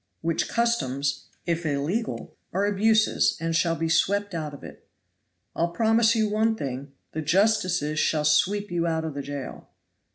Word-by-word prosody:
"Which 165 0 -1
customs, 145 - 0 0.2
if 170 0 -1
illegal, 155 +10 -2 0.2
are 195 +3 +1
abuses, 215 +2 +3
and 165 0 -1
shall 165 0 +2
be 165 0 -1
swept 200 +4 +1
out 155 -3 -3
of 145 - -12
it." - - -12 0.7
"I'll 170 +1 +1
promise 225 +3 +3
you 220 -1 +2
one 220 +2 +1
thing 140 -4 -5 0.2
the 160 - -3
justices 175 -3 +2
shall 150 -1 +1
sweep 200 +6 +2
you 170 -1 0
out 160 -1 -1
of 160 - -4
the 140 - -4
jail." 140 -1 -7
170 Hz, 160 wpm, -25 LUFS, 150-210 Hz, 0.7 s, abuses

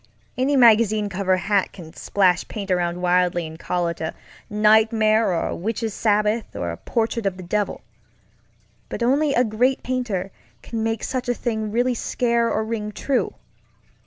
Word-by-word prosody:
Any 270 +3 +1
magazine 215 -4 +4
cover 190 -1 +1
hack 195 +1 0
can 165 -4 -11
splash 185 -3 +1
paint 200 -3 -5
around 175 0 0
wildly 180 -1 +2
and 160 +1 -9
call 175 -1 -1
it 170 -1 -5
a 160 - -3 0.3
nightmare 215 0 +3
or 170 - -1
Witches' 220 +3 -3
Sabbath 210 +1 0
or 85 - -3
a 85 - -7
portrait 230 -2 -1
of 190 -1 -2
the 185 - -8
devil, 205 +4 -2 1.1
but - - -3
only 280 +4 +2
a 245 - +4
great 245 +4 +1
painter 225 -7 -2 0.3
can 225 -1 -4
make 225 -1 -1
such 255 -2 -3
a 245 - +1
thing 220 -3 -3
really 245 +3 +1
scare 235 0 0
or 220 - 0
ring 215 -2 -3
true. 265 +4 -1
215 Hz, 160 wpm, -22 LUFS, 185-235 Hz, 1.1 s, magazine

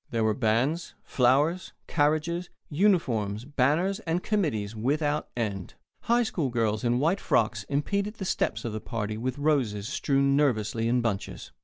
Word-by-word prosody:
There 115 -2 0
were 110 0 +2
bands, 125 +9 0
flowers, 145 +8 +2
carriages, 160 +3 0 0.2
uniforms, 125 - +1
banners, 150 +8 +1
and 175 -3 -2
committees 130 - -1
without 145 +6 0
end. 100 -5 -3 0.3
High 240 +1 +3
school 165 - -1
girls 110 -3 0
in 120 0 +2
white 165 +9 +1
frocks 110 -2 +1
impeded 200 +9 -1
the 195 - -5
steps 115 -10 -1
of 115 - -3
the 110 - -4
party 110 -3 -3
with 125 +4 -3
roses 130 -9 0
strewn 140 -1 +1
nervously 115 -5 +1
in 125 +1 +2
bunches. 110 -4 -3
135 Hz, 150 wpm, -27 LUFS, 110-160 Hz, 0.3 s, High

